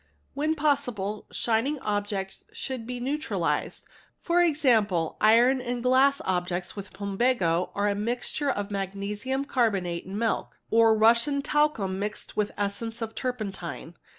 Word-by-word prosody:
When 305 +3 0
possible, 245 -9 -1
shining 235 +6 0
objects 205 -3 -3
should 255 -4 -5
be 250 0 -4
neutralized, 285 +5 -2 0.2
— - - -36
for 350 0 +3
example 225 - +2
iron 240 +4 +5
and 245 -1 -3
glass 265 +2 +4
objects 180 -1 -2
with 200 -2 -7
plumbago 195 -3 0
or 200 - -1
with 205 - +3
a - - -1
mixture 245 +5 -2
of 205 -5 -2
magnesium 205 +7 -3
carbonate 195 -10 0
and 195 +2 -5
milk, 225 0 -1
or 225 -1 +5
Russian 235 +6 +4
talcum 255 -13 +1
mixed 210 +1 -5
with 210 -1 0
essence 220 +3 -3
of 220 - -4
© - - -28
turpentine. 195 -9 -4
225 Hz, 145 wpm, -27 LUFS, 200-260 Hz, 0.2 s, iron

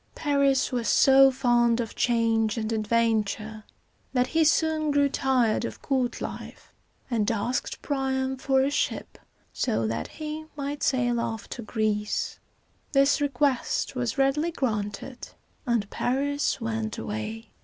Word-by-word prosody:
Paris 280 -3 +2
was 245 -2 -1
so 270 0 +6
fond 240 -2 +2
of 230 -3 -3
change 225 -2 +1
and 220 0 -2
adventure, 220 -1 0 0.5
that 250 -1 +3
he 320 +5 +2
soon 310 0 +2
grew 285 -1 +3
tired 255 -5 +1
of - - -5
court 260 -3 0
life, - - -8 0.4
and 220 -3 +1
asked 230 +3 -2
Priam 265 -2 -1
for 265 0 +1
a 275 - 0
ship, - - -2 0.3
so 220 - 0
that 115 +1 -2
he 310 0 -6
might 285 0 -4
sail 245 -2 +1
off 225 -1 -4
to 240 - -6
Greece. 215 -2 -2 0.5
This 275 +1 +4
request 275 -2 0
was 245 -1 -2
readily 275 +4 +2
granted, 230 -4 -3 0.4
and 235 -4 +1
Paris 285 +4 0
went 225 -2 -3
away. 220 +2 -5
250 Hz, 135 wpm, -26 LUFS, 225-275 Hz, 0.5 s, so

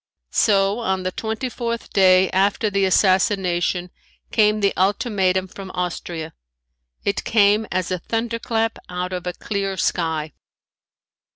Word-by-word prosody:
So 200 +1 +3
on 190 -5 -1
the 185 - -1
twenty 220 +6 -3
fourth 235 -1 -4
day 185 -1 +5
after 200 +3 +1
the 200 -1 +2
assassination 185 -2 +2 0.4
came 215 -1 +3
the 200 - +2
ultimatum 190 -1 +1
from 190 +1 -9
Austria. 170 -2 -4 0.7
It 200 - 0
came 210 0 +3
as 185 0 -1
a 185 - -1
thunderclap 225 +1 -2
out 180 +1 -4
of 180 0 -4
a 180 - -2
clear 195 -1 -3
sky. 160 -4 -1
195 Hz, 125 wpm, -21 LUFS, 180-215 Hz, 0.7 s, day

